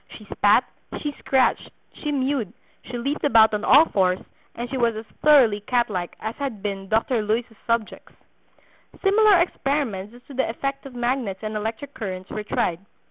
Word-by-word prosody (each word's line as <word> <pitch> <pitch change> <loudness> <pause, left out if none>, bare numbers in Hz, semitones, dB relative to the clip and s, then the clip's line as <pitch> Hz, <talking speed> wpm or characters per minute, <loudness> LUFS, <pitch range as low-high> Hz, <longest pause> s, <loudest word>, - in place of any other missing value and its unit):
She - - -14
spat, - - +4 0.4
she 295 - -3
scratched, 265 -1 +1 0.2
she 300 - -4
mewed, 265 -7 -1 0.3
she 245 - -5
leapt 275 +5 -3
about 225 -6 +5
on 210 0 -1
all 295 +5 +7
fours, 185 - +1 0.4
and 240 +1 -4
she 265 - -5
was 235 -3 +1
as 220 +1 -6 0.2
thoroughly 260 -9 +5
cat 240 +1 0
like 180 -3 -4
as 220 +1 -4
had 260 -8 -5
been 195 -2 -4
Dr. 225 +2 +1
Luys's 225 +2 -2
subjects." 230 -2 -2 0.9
Similar 410 0 +5
experiments 270 - -1
as 245 - -16
to 280 - -13
the 265 -2 0
effect 275 +4 -4
of 260 - -13
magnets 240 -5 -2
and 215 0 -4
electric 220 +6 -4
currents 185 -4 -6
were 215 - -3
tried. 175 -5 -1
235 Hz, 175 wpm, -23 LUFS, 210-275 Hz, 0.9 s, all